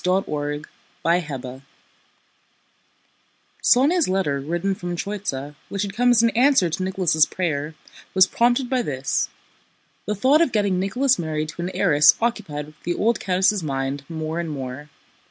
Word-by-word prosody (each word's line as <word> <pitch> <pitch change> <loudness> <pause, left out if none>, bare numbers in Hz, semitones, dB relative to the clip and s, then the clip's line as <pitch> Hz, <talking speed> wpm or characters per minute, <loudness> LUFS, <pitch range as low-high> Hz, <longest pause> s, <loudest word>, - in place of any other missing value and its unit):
CHAPTER 150 -6 -1 0.4
VIII 140 -7 -1 2.0
Sónya's 295 - +4
letter 185 -7 0
written 175 +7 -2
from 175 -2 -5
Tróitsa, 170 -8 -4 0.2
which 200 0 -2
had 200 -1 -5
come 245 +3 +2
as 235 -2 +5
an 230 - +4
answer 245 - +3
to 175 - -3
Nicholas' 180 -5 +2
prayer, 155 -4 -3 0.4
was 190 0 +7
prompted 240 +4 +1
by 255 0 0
this: 135 - -2 0.8
the 210 - -1
thought 270 - +4
of 335 - +2
getting 200 -4 +1
Nicholas 250 +7 +1
married 155 -2 -2
to 170 - -7
an 175 - -2
heiress 150 -6 +5
occupied 155 -11 -3
the 175 - -2
old 230 +2 +1
countess' 190 +2 +1
mind 135 -2 -3
more 160 0 -4
and 170 -1 -3
more. 140 0 -6
180 Hz, 145 wpm, -22 LUFS, 150-210 Hz, 2.0 s, was